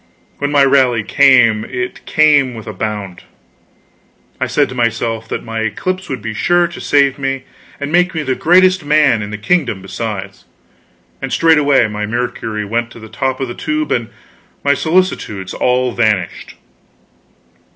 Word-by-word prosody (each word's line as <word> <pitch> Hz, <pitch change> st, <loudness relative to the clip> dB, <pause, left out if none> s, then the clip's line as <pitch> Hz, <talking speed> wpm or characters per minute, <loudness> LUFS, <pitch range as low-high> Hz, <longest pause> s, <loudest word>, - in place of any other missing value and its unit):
When 145 Hz, -, -1 dB
my 140 Hz, -2 st, +5 dB
rally 130 Hz, -5 st, +3 dB
came, 125 Hz, -5 st, +4 dB
it 370 Hz, -1 st, -6 dB
came 145 Hz, -5 st, +3 dB
with 110 Hz, -, -9 dB
a 110 Hz, -, -6 dB
bound. 105 Hz, -5 st, -5 dB, 1.2 s
I -, -, 0 dB
said -, -, +1 dB
to -, -, -7 dB
myself 115 Hz, -2 st, -1 dB
that -, -, -4 dB
my 115 Hz, 0 st, -5 dB
eclipse 185 Hz, -, -3 dB
would 130 Hz, -6 st, -5 dB
be 110 Hz, -1 st, -4 dB
sure 175 Hz, +9 st, +2 dB
to 170 Hz, -, -9 dB
save 140 Hz, -1 st, +2 dB
me, 135 Hz, -1 st, -2 dB, 0.4 s
and 145 Hz, 0 st, -4 dB
make 180 Hz, +1 st, +2 dB
me 160 Hz, -, -1 dB
the 130 Hz, -, 0 dB
greatest 185 Hz, +4 st, +3 dB
man 145 Hz, -6 st, +3 dB
in 105 Hz, -, -5 dB
the 105 Hz, -, -5 dB
kingdom 120 Hz, -, 0 dB
besides; 100 Hz, -1 st, -6 dB, 0.8 s
and 135 Hz, -1 st, -4 dB
straightway 145 Hz, -7 st, +4 dB
my 105 Hz, 0 st, -4 dB
mercury 110 Hz, -2 st, -3 dB
went 115 Hz, +3 st, -1 dB
up -, -, -26 dB
to -, -, -12 dB
the 110 Hz, 0 st, -11 dB
top 130 Hz, +2 st, -2 dB
of 135 Hz, -, -2 dB
the 120 Hz, -, -6 dB
tube, 310 Hz, -, -3 dB
and 115 Hz, -1 st, -1 dB, 0.5 s
my 140 Hz, -, +3 dB
solicitudes 155 Hz, -, -1 dB
all 125 Hz, 0 st, +1 dB
vanished. 105 Hz, -7 st, -1 dB
125 Hz, 165 wpm, -16 LUFS, 110-150 Hz, 1.2 s, my